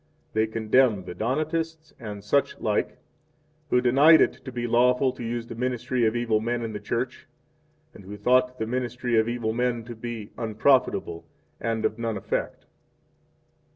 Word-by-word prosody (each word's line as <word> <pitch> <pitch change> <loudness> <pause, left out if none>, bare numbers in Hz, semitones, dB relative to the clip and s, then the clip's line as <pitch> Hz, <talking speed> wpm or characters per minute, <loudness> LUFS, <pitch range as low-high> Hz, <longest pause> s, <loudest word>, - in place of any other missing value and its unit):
3 110 0 +2
They - - -16
condemn 110 -2 +2
the 90 - -6
Donatists, 155 - -2
and 105 -3 -7
such 140 +7 +1
like, 105 -2 -1 0.7
who 125 - +3
denied 140 +6 +6
it 130 - +1
to 130 - -7
be 120 -1 -3
lawful 125 +2 +3
to 125 -1 -9
use 115 0 -3
the 115 - -8
ministry 125 0 0
of 110 - -1
evil 115 -2 +1
men 120 +1 -2
in 110 -1 -4
the 105 - -4
Church, 120 +5 -4 0.7
and 100 - -14
who 105 +2 -8
thought 125 +4 +2
the 110 - -2
ministry 125 0 -1
of 110 +1 +1
evil 120 -2 -2
men 120 -1 -1
to 120 +1 -8
be 110 -2 -7
unprofitable 110 -6 +1 0.3
and 115 -1 -1
of 110 - -1
none 115 -2 -2
effect. - - -3
120 Hz, 170 wpm, -26 LUFS, 110-125 Hz, 0.7 s, denied